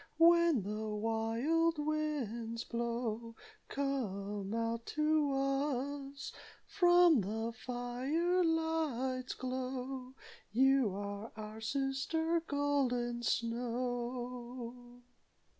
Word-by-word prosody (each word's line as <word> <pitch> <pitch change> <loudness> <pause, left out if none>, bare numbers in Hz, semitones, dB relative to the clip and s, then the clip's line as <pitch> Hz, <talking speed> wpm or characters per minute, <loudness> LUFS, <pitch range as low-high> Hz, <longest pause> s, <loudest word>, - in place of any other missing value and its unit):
When 335 - +6
the 215 +2 -3
wild 230 +10 +1
winds 280 -7 -2
blow, 235 -1 -3 0.3
Come 205 -8 -2
out 230 0 -1
to 305 -1 +3
us 275 0 -1 0.3
From 350 - +5
the 225 +4 -2
fire 260 +10 0
light's 310 -6 0
glow. 255 0 -4 0.4
You 265 +1 +4
are 205 +2 -5
our 215 0 -7
sister, 275 +7 0
Golden 255 -5 +1
Snow." 245 +1 -3
250 Hz, 75 wpm, -34 LUFS, 230-285 Hz, 0.4 s, When